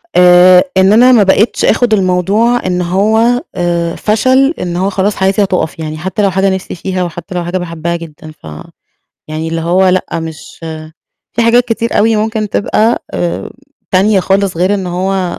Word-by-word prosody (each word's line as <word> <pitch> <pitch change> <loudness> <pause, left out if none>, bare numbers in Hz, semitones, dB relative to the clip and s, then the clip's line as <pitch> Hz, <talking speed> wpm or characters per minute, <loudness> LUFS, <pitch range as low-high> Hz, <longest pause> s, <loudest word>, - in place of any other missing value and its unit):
آآ 180 0 +6
إن 190 +2 +4
أنا 250 +3 +5
ما 225 -5 +5
بقيتش 200 +4 +1
آخد 230 0 +2
الموضوع 200 +5 +1
إن 180 -1 -1
هو 220 +7 +1
آآ 170 -1 -1
فشل، 260 +7 +1
إن 175 -1 -4
هو 190 +2 0
خلاص 200 +1 -1
حياتي 195 +2 +1
هتقف 185 -4 -2
يعني، 155 0 -5
حتّى 190 +6 -3
لو 200 -2 +2
حاجة 195 +2 +1
نِفْسي 190 - -7
فيها، 185 +1 -3
وحتّى 175 +1 -7
لو 175 - -2
حاجة 180 +2 -2
باحبها 170 -1 -4
جدًا، 155 -2 -10
ف 80 - -15 0.8
يعني 155 +1 -5
اللي 165 0 -3
هو 185 +3 +2
لأ 185 0 0
مش 160 -1 -9 0.8
في 235 - 0
حاجات 240 +1 +3
كتير 230 0 -2
أوي 220 +1 +2
ممكن 215 0 -2
تبقى 220 +3 0
آمم 175 -1 -3 0.4
تانية 195 +1 +2
خالص 195 -1 0
غير 185 +4 +1
إن 190 -2 -3
هو 185 0 -2
190 Hz, 175 wpm, -12 LUFS, 175-215 Hz, 0.8 s, آآ